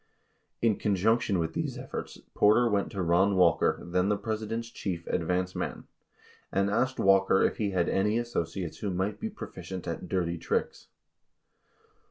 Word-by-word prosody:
38 - - +5
In 105 - -4
conjunction 105 +1 +2
with 80 -1 -1
these - - -3
efforts, - - -6 0.2
Porter 110 +4 +5
went 100 -3 0
to 95 -2 -2
Ron 90 +4 +3
Walker, 90 -2 +3
then 90 +2 +1
the 105 - +2
President's 110 +2 -3
chief 85 -4 -4
"advance 90 +2 -1
man," - - -4 0.7
and 100 +1 +1
asked 130 +5 +1
Walker 95 0 +4
if - - +1
he 105 -2 0
had 90 -3 +1
any 105 +3 +1
associates 90 -7 -3
who 105 - -2
might 95 +3 -2
be 225 - -3
proficient 95 - -8
at - - -5
"dirty 85 -2 -1
tricks." - - -2
95 Hz, 160 wpm, -29 LUFS, 90-110 Hz, 0.7 s, 38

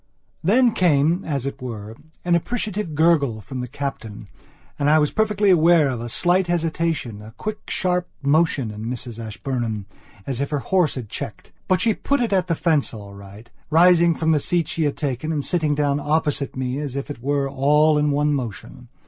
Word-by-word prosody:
Then 235 +7 +4
came, 170 -1 +2
as 140 -5 -2
it 140 - -5
were, 110 -3 -7 0.3
an 175 - +2
appreciative 210 -2 -2
gurgle 145 -8 +3
from 130 +5 -7
the 125 - -4
Captain 110 -7 -6 0.5
and 145 0 +2
I 155 - +6
was 150 -1 +2
perfectly 210 -2 +2
aware 165 -3 +5
of 125 -3 -3
a 120 - -5
slight 180 +7 +2
hesitationa 160 -10 -2
quick 215 0 -6
sharp 180 -1 0
motion 140 -5 +2
in 105 +1 -7
Mrs 120 -1 -6
Ashburnham, 110 -2 -4 0.4
as 135 -1 -3
if 140 - -2
her 150 - -1
horse 175 +2 +1
had 125 -5 -6
checked. - - -7 0.2
But 185 -1 +2
she 225 -1 +3
put 280 +5 -1
it 235 -4 0
at 185 -2 +2
the 165 - +1
fence 155 -7 +1
all 100 -2 -10
right, 100 +3 -12 0.2
rising 170 +1 +5
from 160 0 +1
the 155 - +3
seat 170 +2 0
she 160 - 0
had 145 - -1
taken 145 +1 -2
and 150 -3 -2
sitting 155 -5 +1
down 145 -1 +1
opposite 150 -2 -1
me, 130 +1 -2
as 145 -3 -4
it 140 -2 -5
were, 140 +1 0
all 150 +3 +3
in 150 0 +2
one 145 +1 +1
motion. 115 - -6
145 Hz, 190 wpm, -22 LUFS, 125-170 Hz, 0.5 s, I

